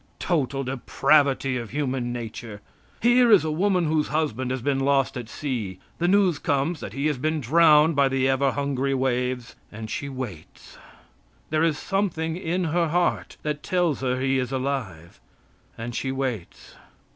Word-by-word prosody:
Total 140 -6 -1
depravity 135 +1 +2
of 115 -3 -5
human 130 -3 -2
nature! 115 -2 -6 0.4
Here 240 0 +5
is 205 -6 +7
a 155 - -1
woman 180 +2 +1
whose 155 -1 +1
husband 135 -5 -1
has 130 -2 -3
been 140 0 +1
lost 135 0 +2
at 120 -3 -6
sea; 115 -10 -4 0.2
the 175 - +1
news 185 -5 +3
comes 145 +4 0
that 100 - -7
he 140 +3 -2
has 150 -4 0
been 155 +3 0
drowned 155 +3 +5
by 140 -1 +4
the 130 0 +1
ever 135 +1 +2
hungry 140 -1 -1
waves, 125 -1 -1 0.2
and 110 +1 -7
she 140 - -3
waits. 120 - -9 0.7
There 155 0 +2
is 160 -3 +2
something 165 -5 -1
in 180 0 -2
her 170 +1 +1
heart 175 +2 0
that 150 -1 -2
tells 175 -6 0
her 130 -1 0
he 135 0 +1
is 125 0 -3
alive. 130 - -4 0.6
And 115 +1 -5
she 130 +3 -2
waits. 130 -9 -5
140 Hz, 165 wpm, -25 LUFS, 125-160 Hz, 0.7 s, is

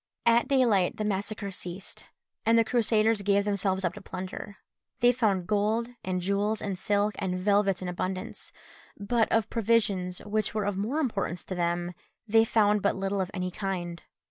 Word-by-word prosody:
At 235 0 +4
daylight 235 -9 +3
the 215 - -2
massacre 205 0 -2
ceased, 180 +1 -7 0.4
and 230 +1 +4
the 230 - +6
Crusaders 220 -2 +2
gave 200 0 +2
themselves 195 -2 0
up 175 - 0
to - - -10
plunder. 190 +2 -7 0.4
They 245 0 +6
found 210 -7 +1
gold, 215 +4 +1
and 185 -1 -2
jewels, 205 +3 0
and 200 -2 -3
silks, 205 +2 0
and 185 -2 -1
velvets 195 -1 +2
in - - -3
abundance, 185 +1 -4 0.5
but 220 +3 +1
of 225 -1 +1
provisions, 205 -5 +1
which 215 0 -1
were 210 -2 0
of 205 -1 -1
more 215 +9 -2
importance 200 - -2
to - - -6
them, 175 0 -1 0.3
they 225 +1 +5
found 210 -2 +3
but 200 - +1
little 195 0 -1
of 185 - -2
any 185 -1 -3
kind. 175 -3 -4
200 Hz, 170 wpm, -28 LUFS, 185-220 Hz, 0.5 s, the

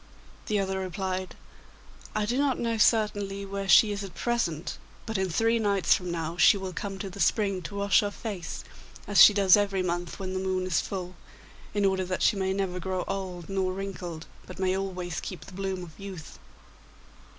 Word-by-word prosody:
The 210 - +1
other 190 -1 -1
replied, 185 0 -3 0.8
'I 215 -1 +1
do 240 +4 -1
not 280 -3 +2
know, 230 -1 -1
certainly, 205 -3 +2
where 195 0 -4
she 215 +1 +7
is 200 0 -3
at 190 -3 -9
present, 205 -10 -1 0.3
but 220 - -4
in 190 -1 0
three 225 +7 +2
nights 200 -3 +3
from 180 -1 -2
now 165 0 -3
she 200 - +6
will 190 -1 -5
come 195 +1 -4
to 195 +1 -5
the 200 - -10
spring 195 -3 +2
to 200 +4 -7
wash 200 0 +4
her 205 - 0
face, 200 -4 -6 0.4
as 205 - +5
she - - +11
does 200 -2 +6
every 200 -2 +1
month 175 -1 -3
when 185 -1 -4
the 185 - -1
moon 185 -1 -1
is 185 -3 +1
full, 185 -2 -5 0.6
in 205 -1 +2
order 190 -1 +2
that 185 0 -2
she - - +4
may 190 -1 0
never 190 -2 -1
grow 185 0 -2
old 185 -3 -4
nor 190 -1 -1
wrinkled, 180 -4 -6 0.2
but - - -9
may 190 0 +1
always 185 -3 -3
keep 180 -5 -7
the - - -12
bloom 190 -1 -3
of 160 -3 -12
youth. 195 -5 -9
190 Hz, 195 wpm, -28 LUFS, 185-200 Hz, 0.8 s, she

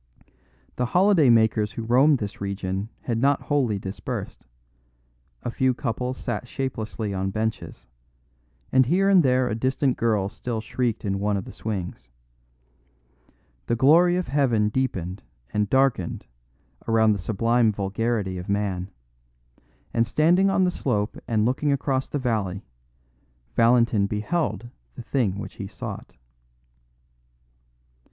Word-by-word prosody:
The 125 - 0
holiday 185 -7 +5
makers 110 -2 +3
who 115 - -5
roam 130 +6 +4
this 105 -6 -5
region 100 +1 -3
had 115 -2 -2
not 140 +2 +3
wholly 130 -8 0
dispersed; 95 -8 -6 1.0
a 120 - -3
few 130 +1 +1
couples 125 +1 -3
sat 125 - -4
shapelessly 110 -5 -4
on 95 0 -1
benches; 110 +2 -4 0.9
and 130 -2 +4
here 190 +6 +3
and 190 -2 +6
there 130 -3 +2
a 115 - -1
distant 130 +3 0
girl 110 -4 +1
still 115 +3 -4
shrieked 115 0 -2
in 100 -1 -1
one 105 0 0
of 95 - -5
the - - -9
swings. 90 - -5 1.6
The 120 - +1
glory 165 +8 +5
of 180 0 -1
heaven 120 -7 +2
deepened 100 -7 -2 0.3
and 105 -1 0
darkened 130 -9 +1 0.6
around 110 -1 +4
the 100 - 0
sublime 115 +4 +2
vulgarity 100 -1 -2
of 90 - -8
man; 100 -2 -1 1.0
and 115 0 +2
standing 175 +9 +3
on 195 -1 +2
the 180 - +2
slope 105 -10 -1
and 110 -2 +1
looking 135 +4 +1
across 135 -1 0
the - - -2
valley, 105 -7 -2 0.9
Valentin 115 -3 +4
beheld 115 - -2 0.3
the - - -8
thing 115 -7 0
which 105 - -8
he 100 - -5
sought. 100 -1 -8
115 Hz, 130 wpm, -24 LUFS, 105-130 Hz, 1.6 s, and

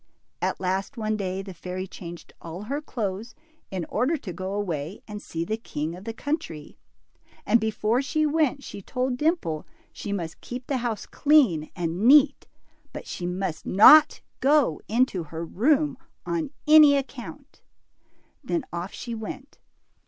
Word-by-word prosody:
At - - -1
last 190 +7 -2
one 215 -1 -1
day 190 -2 -3
the 190 -1 -8
fairy 180 +2 -5
changed 175 -2 -10
all 170 +4 -7
her 280 +7 -3
clothes 225 -4 -4 0.3
in 185 -3 -3
order 295 +7 0
to 195 -10 -7
go 185 +1 -5
away 175 -4 -3
and 210 -1 -7
see 165 0 -4
the 215 +5 -2
king 160 -7 -4
of 185 +3 -12
the 225 - -3
country; 225 - -5 0.7
and 235 - +4
before 220 +2 0
she 310 +3 0
went, 300 -2 +1
she 200 - -8
told 255 +5 -2
Dimple 295 - 0 0.3
she 205 - -6
must 170 -5 -4
keep 245 0 -7
the 270 - -1
house 235 -4 -3
clean 255 - +3
and 170 0 -2
neat, 285 +1 +6 0.4
but - - -8
she 175 - -5
must 180 -3 -3
not 300 +10 +8 0.2
go 275 - +3
into 230 -4 +1
her 160 +2 -6
room 275 - +1 0.3
on 170 +2 -2 0.2
any 305 -2 +8
account. 275 +2 -7 0.8
Then 330 -6 -2
off 175 +3 -4
she 235 - -6
went. 225 +5 -7
215 Hz, 155 wpm, -26 LUFS, 180-275 Hz, 0.8 s, not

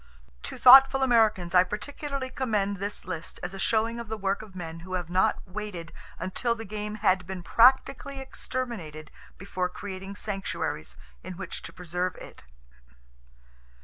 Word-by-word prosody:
To - - -6
thoughtful 270 +1 +9
Americans 215 -8 +3
I 180 0 +7
particularly 270 +6 -5
commend 210 -7 0
this 200 +2 -5
list 175 -3 -6
as 180 +2 -4
a 195 - -7
showing 230 +2 +1
of 235 -2 -7
the 220 - -3
work 195 -1 -1
of 210 -3 -13
men 165 -2 -6
who 185 +2 -9
have 175 -2 -4
not 185 +2 +1
waited 185 -4 -6 0.2
until 235 +5 -1
the 225 0 -7
game 210 +1 -4
had 185 -3 +2
been 185 -2 -6
practically 265 +5 +4
exterminated 225 - -5 0.3
before 185 -2 -2
creating 195 0 -7
sanctuaries 190 - -4 0.2
in - - -7
which 195 - -6
to - - -9
preserve 180 0 -3
it. - - -12
200 Hz, 150 wpm, -27 LUFS, 180-230 Hz, 0.3 s, thoughtful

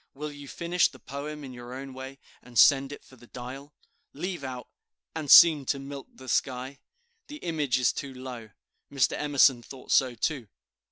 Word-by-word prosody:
Will 150 +2 -5
you 145 -1 -11
finish 170 +4 +1
the 130 - -15
poem 145 +4 -7
in 130 -2 -8
your 120 0 -9
own 135 0 -8
way, 130 +1 -9 0.2
and 125 -1 -11
send 135 +2 +6
it 145 - -10
for 130 - -18
the 120 - -17
'Dial'? 130 +4 -9 0.4
Leave 175 0 -5
out 130 -2 -6 0.5
"And 155 -3 -4
seem 155 -2 +9
to 140 - +1
milk 140 0 -8
the 130 - -14
sky." 130 +2 -2 0.5
The 295 - -8
image 155 - -1
is 125 -3 +2
too 140 - -6
low; 125 -3 -8 0.4
Mr. 135 -3 +2
Emerson 140 -4 +3
thought 130 +2 -11
so 130 -2 +3
too. 125 0 -2
135 Hz, 180 wpm, -27 LUFS, 130-145 Hz, 0.5 s, seem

